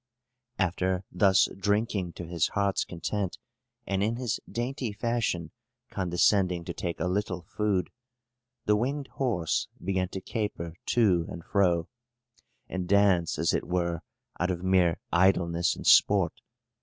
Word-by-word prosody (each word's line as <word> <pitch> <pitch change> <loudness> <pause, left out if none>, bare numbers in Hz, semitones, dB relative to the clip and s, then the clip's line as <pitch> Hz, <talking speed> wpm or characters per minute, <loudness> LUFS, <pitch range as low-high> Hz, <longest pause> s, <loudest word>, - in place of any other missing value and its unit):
After 95 0 0
thus 95 +1 +4
drinking 100 -2 0
to 85 - -7
his 85 -1 0
heart's 100 -1 +2
content, 95 +2 -3 0.5
and 95 0 -1
in 110 +3 +1
his 120 -3 -2
dainty 125 0 -2
fashion 110 -6 -1 0.4
condescending 90 -1 +2
to - - -4
take 85 -2 -4
a - - -1
little 90 -1 -1
food, 100 0 -1 0.7
the 105 - +4
winged 135 +5 -2
horse 100 -11 0
began 95 0 -1
to 95 - -5
caper 95 -5 -4
to 95 -8 +3
and 85 - -8
fro, 90 -5 +2 0.8
and 95 -1 -4
dance 100 -4 +3
as 80 +2 +1
it - - -1
were, 85 -2 -1 0.4
out 90 +2 +1
of 90 -1 -2
mere 90 -3 +3
idleness 85 -2 +3
and - - -9
sport. - - +5
95 Hz, 135 wpm, -28 LUFS, 85-105 Hz, 0.8 s, sport